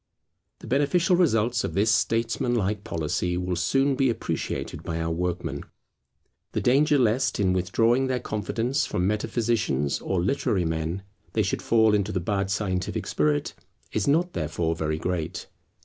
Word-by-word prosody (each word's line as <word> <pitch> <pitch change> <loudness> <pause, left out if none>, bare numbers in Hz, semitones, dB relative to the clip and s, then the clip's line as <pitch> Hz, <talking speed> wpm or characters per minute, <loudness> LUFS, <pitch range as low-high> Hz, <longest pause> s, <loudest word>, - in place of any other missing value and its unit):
The - - -10
beneficial 170 +7 +2
results 120 -9 +2
of - - -3
this 105 +3 +3
statesman 115 +3 +1
like 105 -2 -1
policy 85 +2 -1
will 90 0 -1
soon 135 +11 +2
be 135 -1 +2
appreciated 115 - -3
by 80 0 -4
our 80 0 -1
workmen. 90 +1 -2 0.9
The - - 0
danger 145 +4 +4
lest, 125 0 +1
in 95 -2 +2
withdrawing 115 +8 +2
their 130 -1 0
confidence 120 +7 -1
from 90 - -1
metaphysicians 105 - 0
or 95 - -1
literary 95 -2 0
men, 80 +3 -2 0.3
they 110 - +2
should 95 - -1
fall 110 -2 +4
into 105 0 +1
the 95 - -1
bad 100 +2 -1
scientific 95 -3 -2
spirit, 75 -1 0 0.4
is 110 - -1
not 170 +5 +2
therefore 80 +1 -1
very 80 -1 -1
great. 85 -1 -3
105 Hz, 150 wpm, -26 LUFS, 90-120 Hz, 0.9 s, danger